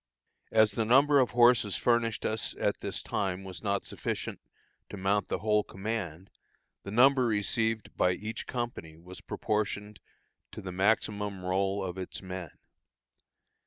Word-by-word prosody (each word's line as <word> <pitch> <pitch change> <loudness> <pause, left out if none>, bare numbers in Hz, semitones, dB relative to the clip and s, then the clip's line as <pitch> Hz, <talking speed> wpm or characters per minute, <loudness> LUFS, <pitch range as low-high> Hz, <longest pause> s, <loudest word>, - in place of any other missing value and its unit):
As 110 -1 +5
the 115 - 0
number 140 +5 +5
of 130 - +3
horses 120 -5 +4
furnished 120 +2 +1
us 110 0 -1
at - - 0
this - - -4
time 95 -2 -2
was 95 -2 -8
not 100 -2 -1
sufficient - - -4 0.5
to 105 - -7
mount 95 +1 +1
the - - -1
whole 105 0 +2
command, 95 -4 -5 0.5
the - - -8
number 130 +3 +5
received 110 +1 0
by 90 - +3
each 110 +4 -6
company 120 -10 -5
was 90 +3 -12
proportioned 105 0 -2 0.5
to - - -7
the 95 - -5
maximum 100 0 0
roll 95 +1 0
of 90 0 -5
its 95 - -6
men. 95 -3 -6
105 Hz, 145 wpm, -30 LUFS, 95-115 Hz, 0.5 s, As